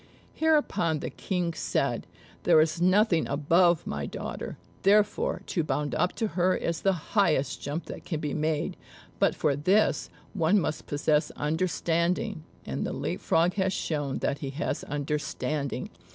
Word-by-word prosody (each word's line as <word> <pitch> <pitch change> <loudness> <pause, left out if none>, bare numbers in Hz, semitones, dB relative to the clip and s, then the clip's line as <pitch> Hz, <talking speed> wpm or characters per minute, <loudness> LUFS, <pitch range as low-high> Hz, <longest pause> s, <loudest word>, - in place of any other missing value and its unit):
Hereupon 295 - +2
the - - -5
King 180 -3 -2
said, - - -1 0.3
"There - - +5
is 160 +2 +2
nothing 185 -1 +4
above 165 +4 +3
my 70 0 -3
daughter; - - -6 0.2
therefore 205 +1 +2
to 170 - -1
bound 150 -1 -1
up 180 +3 +1
to 225 - -1
her 185 0 +2
is 170 -1 -2
the 185 -5 -1
highest 155 -10 +2
jump 145 +4 -4
that - - -8
can 160 -4 -3
be 150 -2 -3
made; 155 -1 -1 0.4
but - - +3
for 145 -3 +1
this, 185 +9 +2 0.2
one 190 +1 +3
must 155 - -3
possess 150 +1 +1
understanding, 170 +4 0 0.2
and - - -3
the - - -3
Leap - - -3
frog 170 +2 +2
has 190 -1 +1
shown 145 -6 -2
that 140 - 0
he 140 - -4
has 140 +6 -3
understanding. 145 -1 -3
165 Hz, 150 wpm, -28 LUFS, 150-185 Hz, 0.4 s, There